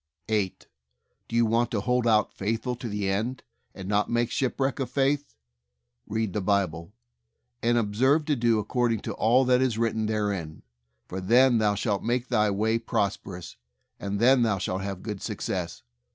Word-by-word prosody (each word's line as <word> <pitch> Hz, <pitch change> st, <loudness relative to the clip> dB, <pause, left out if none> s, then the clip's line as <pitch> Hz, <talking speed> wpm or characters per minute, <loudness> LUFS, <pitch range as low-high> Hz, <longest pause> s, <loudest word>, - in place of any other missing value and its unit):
8. 105 Hz, -4 st, -1 dB, 0.6 s
Do -, -, -5 dB
you 115 Hz, 0 st, +4 dB
want 115 Hz, +2 st, +1 dB
to 110 Hz, -, -1 dB
hold 125 Hz, +2 st, +1 dB
out 110 Hz, -2 st, +3 dB
faithful 115 Hz, +5 st, -2 dB
to 120 Hz, -1 st, -5 dB
the 105 Hz, -1 st, -2 dB
end, 110 Hz, +7 st, -2 dB, 0.3 s
and 95 Hz, -1 st, -7 dB
not 105 Hz, +1 st, +1 dB
make 120 Hz, 0 st, 0 dB
shipwreck 135 Hz, +1 st, -1 dB
of 135 Hz, -, -2 dB
faith? 140 Hz, +1 st, 0 dB, 0.7 s
Read 110 Hz, -2 st, -2 dB
the 105 Hz, -, -1 dB
Bible, 95 Hz, -4 st, 0 dB, 0.7 s
and 120 Hz, +1 st, +2 dB
"observe 130 Hz, +8 st, +2 dB
to 150 Hz, -, +1 dB
do 115 Hz, -2 st, +2 dB
accord 120 Hz, +2 st, 0 dB
ing 110 Hz, -, -3 dB
to -, -, -4 dB
all 125 Hz, +4 st, +3 dB
that 125 Hz, 0 st, +3 dB
is 125 Hz, -4 st, +1 dB
written 110 Hz, -1 st, 0 dB
therein; 100 Hz, -7 st, -2 dB, 0.4 s
for 95 Hz, +1 st, -6 dB
then 120 Hz, +5 st, +5 dB
thou 105 Hz, -1 st, +2 dB
shalt 100 Hz, -1 st, -1 dB
make 120 Hz, +1 st, -1 dB
thy 105 Hz, -4 st, +3 dB
way 110 Hz, +3 st, +1 dB
prosperous, 100 Hz, -6 st, -3 dB, 0.4 s
and 100 Hz, 0 st, -3 dB
then 125 Hz, +2 st, +5 dB
thou 110 Hz, -4 st, +2 dB
shalt 95 Hz, 0 st, -2 dB
have 95 Hz, -1 st, -5 dB
good 105 Hz, -3 st, -5 dB
success." -, -, -4 dB
110 Hz, 175 wpm, -26 LUFS, 100-120 Hz, 0.7 s, then